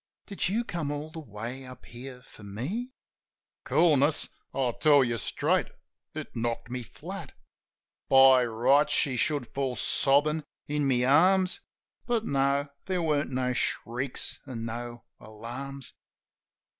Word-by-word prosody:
"Did 200 -3 -2
you 225 +5 0
come 170 -9 -4
all 145 +2 -4
the 165 - -7
way 120 0 -7
up 130 -1 -12
here 125 +1 -10
for 110 - -17
me?" 150 - -5 0.7
Coolness? 150 -2 +3 0.2
I 130 -3 0
tell 145 -3 +6
you 120 -2 -1
straight, - - 0 0.5
it - - -7
knocked 115 +1 -3
me 125 0 -3
flat. 155 - -9 0.8
By 135 -1 +7
rights, 125 +6 +3
she 135 -3 +2
should 140 0 0
fall 135 -2 -1
sobbin' 145 +5 +3 0.2
in 145 -1 0
my 125 -2 +2
arms; 180 +8 +4 0.5
But 235 -2 0
no; 140 +1 +1 0.2
there 185 -2 0
weren't 150 -2 +1
no 130 -1 -1
shrieks 125 +2 -2
an' 115 -3 -5
no 120 +1 -6
alarms. 125 +5 -8
135 Hz, 130 wpm, -28 LUFS, 120-150 Hz, 0.8 s, By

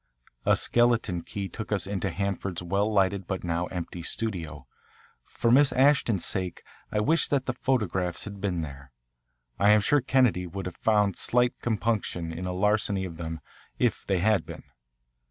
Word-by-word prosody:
A - - +6
skeleton 120 -7 +2
key 100 +2 -5
took 110 +2 -7
us 100 -3 +1
into 100 -1 -2
Hanford's 100 -1 -3
well 100 +5 0
lighted 100 -2 +1
but 95 -2 -3
now 85 0 -1
empty 90 -1 -6
studio. 85 - -3 0.6
For 115 - 0
Miss 135 +2 +5
Ashton's 130 - +3
sake 95 -3 -3 0.3
I 105 - 0
wished 155 +10 +2
that 135 -2 +1
the 130 - -1
photographs 100 -9 -1
had 100 -2 -8
been 90 -5 -1
there. 70 -3 -9 0.7
I 100 - +5
am 105 0 +6
sure 145 +7 +3
Kennedy 125 -9 +2
would 95 +3 -6
have 90 - -6
found 105 -4 +2
slight 125 0 +2
compunction 110 -7 -1
in 90 +3 -5
a - - -2
larceny 100 0 +1
of 85 -3 -8
them, 80 -1 -5 0.4
if 120 -3 0
they 95 - 0
had 100 -1 +2
been. - - -9
100 Hz, 170 wpm, -27 LUFS, 90-110 Hz, 0.7 s, A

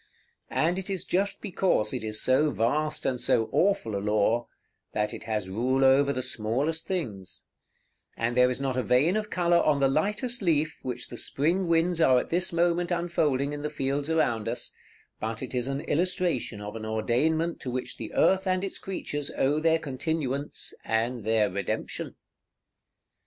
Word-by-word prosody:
And 170 +4 +1
it 190 - -7
is 190 -3 -3
just 195 +2 0
because 185 - +1
it - - -3
is 110 0 -2
so 135 +4 +3
vast 145 +7 0
and 125 -2 0
so 110 - +2
awful 175 - +1
a 100 - -2
law, 105 +3 +1 0.5
that 105 0 -1
it - - -8
has 105 -4 -2
rule 130 +7 +1
over 140 +1 +5
the 130 -2 -2
smallest 130 +7 -1
things; 105 - -5 0.7
and 115 +1 -1
there 125 0 +5
is 125 - -2
not 135 -2 -1
a 130 - +1
vein 135 - +3
of 215 0 -2
color 175 -3 +3
on 150 -2 +3
the 135 - +4
lightest 210 - 0
leaf 155 -4 +1
which 125 -1 -5
the 120 - -7
spring 170 +10 0
winds 170 +1 +2
are 130 -5 +6
at - - -6
this 175 +2 +3
moment 175 0 +1
unfolding 155 -5 0
in 145 - -5
the 150 - -2
fields 140 0 -2
around 120 -10 +1
us, 120 +1 -1 0.5
but 110 +2 -4
it 130 - -6
is 125 0 -1
an 135 +1 -2
illustration 165 - 0
of 105 +1 -7
an 110 - -6
ordainment 125 +10 0
to 130 - -5
which 125 +1 -4
the 110 - -6
earth 190 0 +3
and 185 0 +1
its 195 - -3
creatures 145 -6 -4
owe 145 +3 +2
their 160 +1 +3
continuance, 145 -1 -2
and 115 +1 -1
their 110 0 +2
Redemption. 100 +1 -4
140 Hz, 180 wpm, -27 LUFS, 120-170 Hz, 0.7 s, are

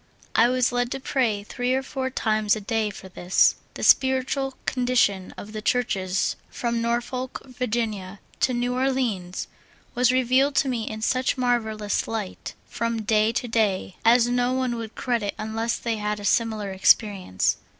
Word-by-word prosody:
I 235 +2 +5
was 255 0 +2
led 245 0 0
to 270 - -4
pray 235 -6 0
three 245 +4 -1
or 265 - -1
four 265 -1 -3
times 215 -4 +1
a - - -4
day 215 +1 -1
for 190 -1 -10
this; 180 0 +3 0.2
the - - -6
spiritual 265 0 +3
condition 245 -7 +1
of 215 +1 -9
the 215 - -4
Churches 195 -6 0
from 235 -1 -2
Norfolk, 240 +2 -2
Va., 250 -1 -4 0.7
to 255 - +2
New 245 +1 0
Orleans 250 -9 -1 0.5
was 250 0 +3
revealed 260 +2 +2
to 275 - +3
me 235 -4 -2
in 220 0 -6
such 255 +3 +1
marvelous 220 -4 0
light, 215 -4 -5
from 230 -1 -2
da}" 215 +1 +3
to 245 - -2
day, 210 -5 0
as 235 +1 +5
no 245 +1 +1
one 255 -2 0
would 225 -1 -7
credit 235 -5 -1
unless 225 +2 -2
they 230 -2 -2
had 210 0 -2
a 205 - -7
similar 215 -3 +1
experience. 190 - +2
235 Hz, 160 wpm, -24 LUFS, 215-255 Hz, 0.7 s, I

